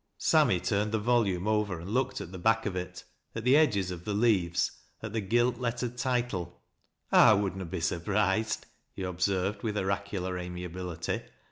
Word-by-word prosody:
Sammy - - +3
turned 105 +1 0
the 110 - +1
volmne 105 -5 +1
over, 105 -5 0
and 90 +5 -7
looked 130 +2 0
at 85 - -8
the 95 - -7
Dack 110 +3 +2
of 100 -3 -2
it, 90 0 -5 0.3
at 115 - -4
the 125 +3 +5
edges 105 -12 +3
of 90 -1 -7
the 105 +2 -2
leavss, 100 -6 +2 0.3
at 110 -1 -5
the 110 - 0
gilt 120 +5 +2
iettered 125 0 -2
title. 120 -8 -2 0.2
" - - -51 0.2
I - - +8
would 100 -2 0
na 95 -1 -5
be 85 +1 -5
surprised," 100 +5 0 0.3
he 95 - -5
observed 95 +2 -1
with 110 -2 -2
oraculai 95 -2 -2
amiability. 90 -1 -4
100 Hz, 175 wpm, -29 LUFS, 90-110 Hz, 0.3 s, I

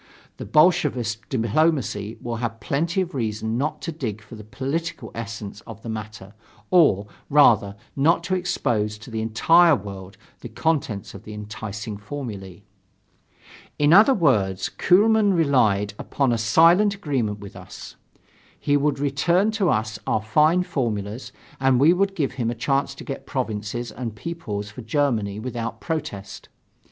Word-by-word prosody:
The - - -7
Bolshevist 130 - +2
diplomacy 115 -3 0
will 120 -1 -4
have 115 -1 -4
plenty 165 - -1
of 180 -1 -4
reason 110 -3 -2
not 150 +1 -2
to 165 - -3
dig 120 -10 -4
for 115 +1 -16
the 110 -1 -9
political 140 +10 -4
essence 110 -2 -7
of 110 -1 -10
the 115 - -6
matter, 105 -2 -7 0.4
or, 150 - +4 0.2
rather, 110 -9 +5 0.2
not 150 +5 +3
to 185 - -2
expose 110 - -1
to 115 +3 -12
the 110 -1 -2
entire 165 +10 +5
world 100 -4 -8 0.2
the 120 - -9
contents 120 -4 -2
of 100 - -10
the 105 - -9
enticing 105 0 -6
formulae.... 100 -6 -7 1.1
In 145 +2 +4
other 220 +8 +7
words, 100 - +1
Kuehlmann 205 +2 +3
relied 110 - +2
upon 135 -3 0
a - - +1
silent 170 - +4
agreement 130 - -2
with 100 -1 -11
us. - - -11 0.6
He 145 - +1
would 145 0 +1
return 165 +9 +1
to 205 -5 +1
us 110 0 -1
our 110 - 0
fine 155 +10 +3
formulas 115 - -3 0.3
and 130 -1 +3
we 150 +5 +6
should 195 +2 +1
give 145 -7 0
him 125 -3 -2
a 120 - -3
chance 135 +3 0
to - - -10
get 135 - -7
provinces 120 -2 -3
and 115 -4 -6
peoples 105 -8 -5
for 115 - -9
Germany 110 -5 0
without 120 -1 -4
a - - -28
protest. 150 - -5
120 Hz, 155 wpm, -23 LUFS, 105-155 Hz, 1.1 s, other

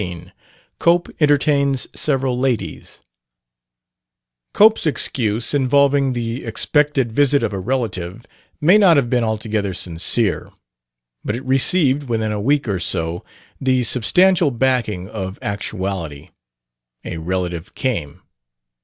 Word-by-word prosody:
15 90 -2 -7 0.5
COPE 175 +1 +2
ENTERTAINS 140 -2 +2
SEVERAL 135 -4 -1
LADIES 130 -4 -3 1.5
Cope's 215 -4 +4
excuse, 115 -5 -1
involving 140 0 +2
the 120 +1 -4
expected 135 +2 0
visit 140 +2 +2
of 110 -2 -1
a 95 - -3
relative, 100 -3 -3 0.3
may 175 +7 +5
not 180 -6 +5
have 120 -4 0
been 125 -2 +2
altogether 110 -3 -2
sincere, 90 +5 0 0.7
but 105 - -2
it 130 +3 -7
received, 135 +1 +2
within 110 -2 -1
a 105 -1 -3
week 140 +3 +1
or 100 -3 -1
so, 85 0 -1 0.4
the 130 -1 +1
substantial 175 +9 +3
backing 115 -7 -1
of 95 -2 -6
actuality: 95 -7 -4 0.8
a 85 - -5
relative 90 0 -4
came. 90 - -3
120 Hz, 115 wpm, -19 LUFS, 100-140 Hz, 1.5 s, may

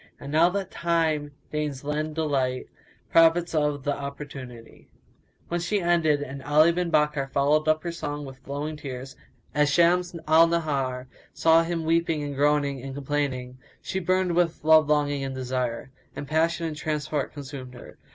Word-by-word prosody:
And 140 - -8
now 165 +3 +5
that 195 0 -3
Time 160 -3 0 0.2
deigns 150 -3 -3
lend 150 +1 -2
delight 135 -5 0 0.2
* - - -33
Profit 165 +1 +4
of 150 -3 0
th' 145 - -2
opportunity." 140 -4 -7 0.6
When 175 - -1
she 200 +4 0
ended, 160 -5 +2 0.2
Ali 155 +3 +5
bin 175 0 -1
Bakkar 150 -3 +1
followed 145 +3 +2
up 155 0 +2
her 170 - -3
song 145 -3 -5
with 135 -1 -10
flowing 145 +3 -5
tears; 135 -2 -7 0.4
and, 150 - +1
as 150 - +4
Shams 175 +2 +3
al 160 +2 +6
Nahar 140 -6 -1 0.3
saw 165 0 +5
him 165 -1 -2
weeping 165 -2 +1
and 145 -1 -4
groaning 145 -1 +1
and 135 0 -7
complaining, 135 -3 -3 0.2
she 190 - -3
burned 185 -1 +1
with 170 -2 +1
love 155 -1 +5
longing 145 -2 +1
and 135 -1 -4
desire; 125 -1 -3 0.2
and 145 - -6
passion 165 +3 +1
and 160 -2 -3
transport 150 -2 -2
consumed 135 -3 -8
her. 120 - -13
150 Hz, 165 wpm, -26 LUFS, 140-165 Hz, 0.6 s, al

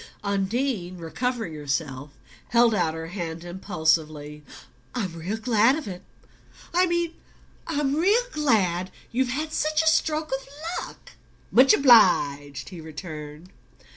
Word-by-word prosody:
Undine, 200 -1 -1
recovering 220 +3 -3
herself, 145 -2 -3 0.4
held 235 -1 +4
out 170 -5 0
her 160 0 -6
hand 170 -3 -5
impulsively. 155 -4 -1 0.5
"I'm 195 -8 -2
real 170 +6 -4
glad 230 +2 +3
of 310 -5 -6
it 180 -2 -6 0.7
I 365 +1 +4
mean 345 -1 0 0.5
I'm 290 -3 0
real 400 +10 +3
glad 190 - +1 0.2
you've 255 +1 0
had 305 +5 -3
such 310 +1 +1
a - - 0
stroke 315 0 +1
of 270 0 -3 0.4
luck!" - - -15 0.4
"Much 260 +2 +7
obliged," 145 - +4
he 180 -4 -9
returned. 155 +1 -9
200 Hz, 125 wpm, -25 LUFS, 160-270 Hz, 0.7 s, Much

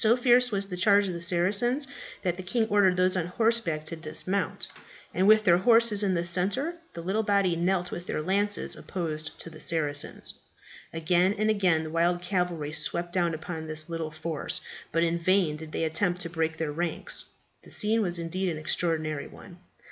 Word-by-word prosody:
So 225 +2 +4
fierce 250 0 +4
was 200 -1 +1
the 180 -2 -6
charge 200 +2 +4
of 185 - -3
the 170 - -6
Saracens 200 - +2 0.4
that 175 -3 0
the 185 - -6
king 220 +5 0
ordered 195 -3 +3
those 185 0 +4
on 175 -2 -1
horseback 215 -6 0
to 165 - -5
dismount, 165 +3 -2 0.5
and 185 +3 +2
with 215 0 +6
their 175 -3 +5
horses 230 0 +4
in 195 -3 +1
the 170 - 0
centre, 195 - +1 0.2
the 170 - -7
little 195 +5 0
body 200 -4 +2
knelt 180 +1 0
with 175 +1 -6
their - - -2
lances 200 +4 +1
opposed 155 -4 -4
to 165 - -8
the 155 - -12
Saracens. 145 -3 -1 0.6
Again 175 +4 +2
and 215 +1 +2
again 180 -6 +2
the 155 - -6
wild 170 +2 +2
cavalry 180 -5 -1
swept 170 +3 -2
down 175 -3 +1
upon 160 0 -6
this 155 +1 -1
little 165 -2 -3
force, 155 0 -3 0.3
but 165 +1 +2
in 170 0 0
vain 180 -3 +2
did 155 0 -9
they - - -2
attempt 175 +3 0
to 170 - -1
break 160 -1 -1
their 160 -2 -2
ranks. 170 +2 -3 0.4
The - - -17
scene 220 +2 +1
was 175 -4 0
indeed 180 +3 -2
an 160 - -3
extraordinary 155 -1 -1
one. 180 -2 -14
175 Hz, 195 wpm, -27 LUFS, 165-200 Hz, 0.6 s, with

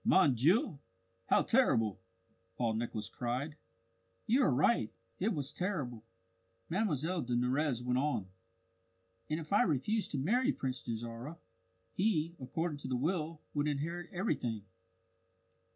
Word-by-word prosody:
Mon 185 -8 +5
Dieu, 155 - +3 0.5
how - - +4
terrible!" 115 - +3 0.6
Paul 115 -2 +1
Nicholas 110 -1 -2
cried. 125 +5 -3 0.7
"You 250 +5 +4
are - - +5
right. 145 - +3 0.3
It 210 +5 +2
was 145 -7 -2
terrible!" 145 - -2 0.7
Mlle 175 - +1
de 120 0 -1
Nurrez 125 +1 +1
went 125 +1 +1
on. 140 -8 0 1.0
"And 155 +1 0
if 155 +3 -5
I 205 - +6
refused 210 - +1
to - - 0
marry 230 - +2
Prince 130 -1 -3
Dajarah, 115 +6 -5 0.6
he, 170 -5 +1
according 150 +4 -2
to - - -5
the 130 - 0
will, 160 +2 -1
would 145 0 +1
inherit 165 +5 -2
everything. 125 - -1
150 Hz, 130 wpm, -34 LUFS, 125-175 Hz, 1.0 s, I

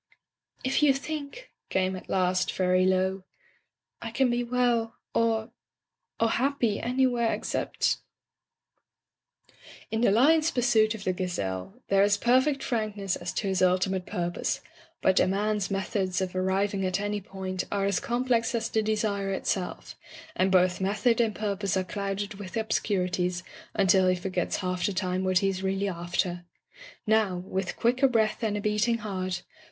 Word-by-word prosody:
"If 260 +3 +1
you 285 -2 +5
think,'* 305 - -6 0.2
came 190 0 0
at 185 - -10
last, 185 0 +1
very 185 0 +2
low, 190 0 +1 0.8
"I 230 - -4
can 250 +2 +2
be 240 0 0
well 240 -1 +1
— - - -60
or 225 0 +1 0.3
— - - -54
or 230 - +3
happy 240 -3 +1
anywhere 245 -1 +1
ex - - -3
cept - - 0 0.5
" - - -25
In 220 0 0
the 240 - +5
lion's 305 +9 +4
pursuit 230 -5 +3
of 205 - -8
the 185 - 0
gazelle 180 - -4
there 195 0 +4
is 205 0 +4
perfect 260 +5 +2
frankness 210 -5 -1
as 175 - -5
to 200 - -2
his 190 -1 0
ultimate 185 0 +2
purpose, 175 0 -2 0.4
but 190 - +4
a - - +4
man's 205 0 0
methods 190 -1 -1
of 185 -1 -3
arriving 195 +1 0
at 185 0 0
any 205 0 -2
point 190 -1 -4
are 200 -1 0
as 200 -2 +1
complex 240 -1 0
as 225 -1 -1
the 220 - +2
desire 210 -2 -1
itself, 190 -1 -3 0.4
and 190 +1 +2
both 185 0 +3
method 215 +5 +2
and 220 -3 0
purpose 200 -2 -1
are 190 - +1
clouded 200 +2 -3
with 200 +2 -6
ob 220 0 -2
scurities 180 -3 0 0.3
until 190 -2 +4
he 185 - +3
forgets 180 -1 -2
half 180 -2 -2
the 200 - -2
time 185 0 -1
what 185 -1 +2
he - - +3
is 190 -1 -3
really 195 +1 0
after. 175 0 -2 0.6
Now, 215 -4 +2
with 185 +1 -3
quicker 250 +3 +3
breath 220 -4 +1
and 215 -2 0
a - - -3
beating 210 +3 +1
heart. 185 -4 -4
200 Hz, 165 wpm, -27 LUFS, 185-230 Hz, 0.8 s, you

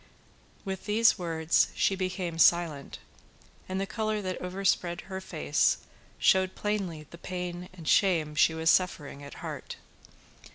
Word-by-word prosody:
With 190 -1 -5
these 220 0 +4
words 165 -2 +2
she - - +2
became 185 -3 -3
silent, 165 -5 +3 0.7
and 190 0 -2
the 195 - -1
colour 215 0 -2
that 185 -2 -4
overspread 180 -1 0
her 190 0 -7
face 155 -5 +1 0.4
showed 190 0 +3
plainly 190 -7 -3
the 170 - -11
pain 180 0 -5
and 170 -4 -11
shame 165 -6 +3
she 160 +2 +3
was 160 +1 +3
suffering 150 -6 0
at 140 - -10
heart. - - -6
180 Hz, 135 wpm, -29 LUFS, 165-190 Hz, 0.7 s, these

